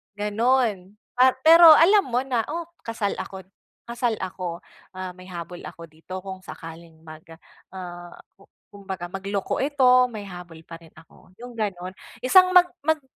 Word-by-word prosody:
gano'n. 210 -2 0 0.2
Pa 255 +1 +5
pero 330 0 +9
alam 390 +6 +5
mo 245 +1 0
na, 250 -4 -1
oh, 335 +2 -5 0.2
kasal 225 -3 -2
ako 190 -1 -7 0.5
kasal 235 -1 -1
ako, 180 -2 -6 0.3
ah, 185 -1 -6
may 185 - -13
habol 175 -1 -8
ako 165 -1 -11
dito 185 +4 -9
kung 190 -1 -8
sakaling 165 -1 -11
mag, 155 0 -13 0.5
ah, 175 -1 -9 0.2
ku 195 - -21 0.2
kumbaga 190 -3 -8
magloko 195 +1 -3
ito 260 -3 +4
may 215 - -6
habol 175 -3 -11
pa 165 0 -11
rin 165 -1 -20
ako 165 +3 -20
'yung 245 -1 -10
gano'n 185 -4 -3 0.3
isang 365 +9 +5
mag 360 -1 +6 0.2
mag 315 -1 +1
195 Hz, 155 wpm, -23 LUFS, 175-255 Hz, 0.5 s, pero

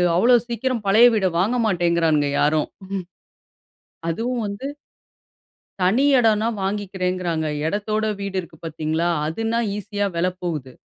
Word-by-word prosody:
அவ்ளோ 240 +7 +5
சீக்கிரம் 240 0 -2
பழைய 220 +5 +7
வீட 205 -3 +1
வாங்க 215 +7 +1
மாட்டேங்கிறானுங்க 170 -5 +2
யாரும். 150 +1 +2 0.2
ம், - - -15 1.0
ம். - - - 0.2
அதுவும் 235 +6 -2
வந்து 200 +6 -5 1.2
தனி 210 +10 +3
இடன்னா 220 -2 +3
வாங்கிக்கிறேங்கிறாங்க. 185 -4 -2 0.2
இடத்தோட 215 +3 -1
வீடு 200 -1 -4
இருக்கு 170 -3 -9
பார்த்தீங்களா, 160 +1 -1 0.2
அதுனா 225 +8 -1 0.2
ஈஸியா 205 0 -2
விலை 180 +2 +1
போகுது. 150 -7 -4
195 Hz, 120 wpm, -22 LUFS, 170-220 Hz, 1.2 s, பழைய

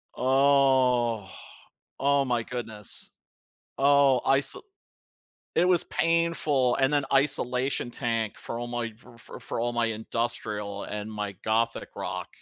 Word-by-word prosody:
Oh, 130 -5 +3 0.7
oh 140 0 +3
my 120 -2 0
goodness. 110 -4 -6 0.7
Oh, 140 -2 +5
I 135 0 +4
sa 140 - -5 0.9
it 175 - +4
was 180 -2 +3
painful, 165 -6 +1
and 135 +1 +2
then 145 -2 +2
isolation 135 -2 +1
tank 115 -3 -2
for 115 - -6
all 120 0 -3
f 115 0 -9 0.3
f - - -9
for 120 +1 -2
my 120 -1 +1
industrial 110 -2 -3
and 105 +1 -5
my 105 -1 -3
gothic 115 +1 0
rock, - - -4
120 Hz, 120 wpm, -27 LUFS, 115-135 Hz, 0.9 s, Oh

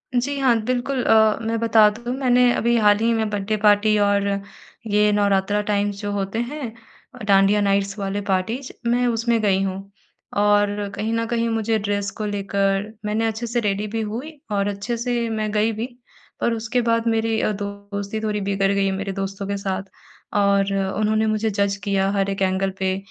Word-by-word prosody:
जी 280 +4 0
हाँ। 255 -3 +4
बिल्कुल 255 +1 -1
अ, 220 -1 +4
मैं 225 0 -1
बता 220 -2 +5
दूँ 240 +4 -5
मैंने 250 -2 +4
अभी 235 +1 +1
हाल 210 -2 +5
ही 230 +1 +2
में 220 -1 0
बर्थडे 210 +1 -1
पार्टी 210 0 +4
और 200 0 +2 0.6
ये 210 0 +3
नवरात्रा 205 0 +2
टाइम्स 205 -1 -1
जो 205 -1 -3
होते 200 +2 -2
हैं 250 0 -4 0.4
अ, 250 - -10
डांडिया 200 0 +4
नाइट्स 200 0 +1
वाले 195 +1 -2
पार्टीज़, 220 +8 -1 0.2
मैं 245 +1 +2
उसमें 230 0 +1
गई 195 -2 +2
हूँ। 195 +1 -5 0.5
और 205 0 +2
कहीं 220 +2 -2
न 230 0 0
कहीं 230 0 0
मुझे 225 0 0
ड्रेस 200 -1 -1
को 215 - -3
लेकर 200 0 -1
मैंने 215 +2 0
अच्छे 225 +2 -3
से 240 +1 0
रेडी 210 -1 -1
भी 225 +2 -3
हुई 250 +9 -6
और 200 0 +1
अच्छे 205 +4 -3
से 235 -1 -1
मैं 215 -1 -2
गई 215 +1 +2
भी, 220 +1 -3 0.5
पर 235 - +1
उसके 230 +2 -1
बाद 230 0 +1
मेरी 225 0 +1
अ, - - +1
दोस्ती 200 0 -5
थोड़ी 210 -1 -1
बिगड़ 195 0 +1
गई 200 0 +1
है 195 - +1
मेरे 195 +1 -3
दोस्तों 195 +1 -4
के 200 0 -2
साथ। 195 0 -3 0.6
और 200 0 +2 0.2
उन्होंने 215 +1 +1
मुझे 215 0 0
जज 200 -1 0
किया 195 -1 +1
हर 200 -1 0
एक 195 0 -3
एंगल 190 0 +1
पे 190 0 0
210 Hz, 190 wpm, -22 LUFS, 200-225 Hz, 0.6 s, बता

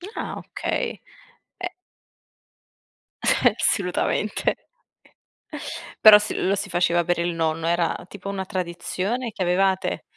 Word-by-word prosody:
Ah - - -4
okay. - - -3 0.6
E 360 - -1 1.6
Eh, - - +4
assolutamente. 195 +2 0 1.5
Però 215 -1 +10
si 210 - -3
lo 190 - +1
si 200 0 -3
faceva 175 -1 +2
per 175 +1 0
il 170 0 0
nonno. 160 0 -1
Era 170 +1 0
tipo 200 -1 -9
una 195 -1 -3
tradizione 190 +6 -3
che 190 - -4
avevate? 190 +2 +1
185 Hz, 110 wpm, -24 LUFS, 175-200 Hz, 1.6 s, Però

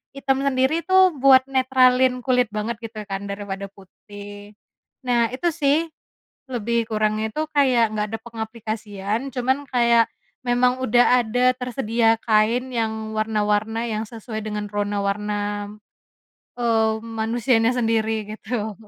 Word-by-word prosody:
hitam 270 0 0
sendiri 275 +4 +1
tuh 375 -2 +4
buat 265 -1 +6
netralin 255 -1 +3
kulit 250 -2 +3
banget 215 +2 -3
gitu 225 -1 -7
kan 195 0 -4
daripada 200 -1 -6
putih, 205 +1 -12 0.5
nah 235 -2 +2
itu 270 +8 -2
sih, 285 -2 +3 0.7
lebih 235 -1 0
kurangnya 215 0 0
itu 310 +6 -3
kayak 255 -6 +3
nggak 210 0 -1
ada 225 - -4
pengaplikasian, 220 0 -5
cuman 260 +3 0
kayak, 235 -2 +3 0.4
memang 250 +1 +2
udah 245 +1 +4
ada 245 +3 +2
tersedia 230 -2 +1
kain 230 +4 +2
yang 220 -1 -2
warna-warna 215 +1 0
yang 215 0 -2
sesuai 220 0 -7
dengan 210 -1 -4
rona 205 0 -1
warna, 210 +1 -1 1.2
eee, 225 -2 +2
manusianya 225 +1 +1
sendiri 225 -2 0
gitu. 220 -1 -4
225 Hz, 125 wpm, -22 LUFS, 215-250 Hz, 1.2 s, buat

